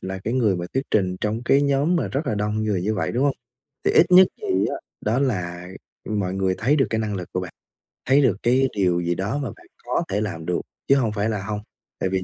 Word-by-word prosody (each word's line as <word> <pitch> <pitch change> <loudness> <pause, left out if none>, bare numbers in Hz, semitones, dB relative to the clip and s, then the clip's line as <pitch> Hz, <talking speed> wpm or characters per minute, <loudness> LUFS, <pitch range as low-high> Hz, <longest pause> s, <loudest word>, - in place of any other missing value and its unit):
là 95 0 -5
cái 115 +4 -1
người 110 -7 +2
mà 85 - -4
thuyết 135 - +1
trình 95 -3 +1
trong 110 +2 -1
cái 140 +3 +4
nhóm 140 +5 +2
mà - - -1
rất 140 +3 -2
là 110 - 0
đông 105 +1 -1
người 100 -4 0
như 110 +3 0
vậy, 90 -6 -1
đúng 130 +4 +1
hông? 140 - +1 0.5
Thì - - +3
ít 175 - +6
nhất 185 +1 +9 0.2
thì 390 -3 +1
á - - -3 0.2
đó 110 +4 0
là, 90 -9 -2 0.4
ừm, 105 -1 -2
mọi 95 -1 -2
người 95 -1 +1
thấy 140 +7 +2
được 135 - +3
cái 110 - 0
năng 110 -2 -2
lực 90 -2 -6
của 90 - -1
bạn, 90 -2 -7 0.5
thấy 135 +3 +5
được 110 -8 +3
cái 130 +3 +3
điều 90 -3 +2
gì 85 0 0
đó 105 +8 -2
mà 135 -5 -3
bạn - - -19 0.2
có - - 0
thể 100 +2 0
làm 85 -6 -4
được, 90 0 -1 0.3
chứ 135 - +6
hông 120 -6 +1
phải 105 +1 -1
là 105 -3 -2
hông. 105 0 -3 0.4
Tại 95 - 0
vì 95 0 -1
105 Hz, 265 wpm, -23 LUFS, 95-130 Hz, 0.5 s, nhất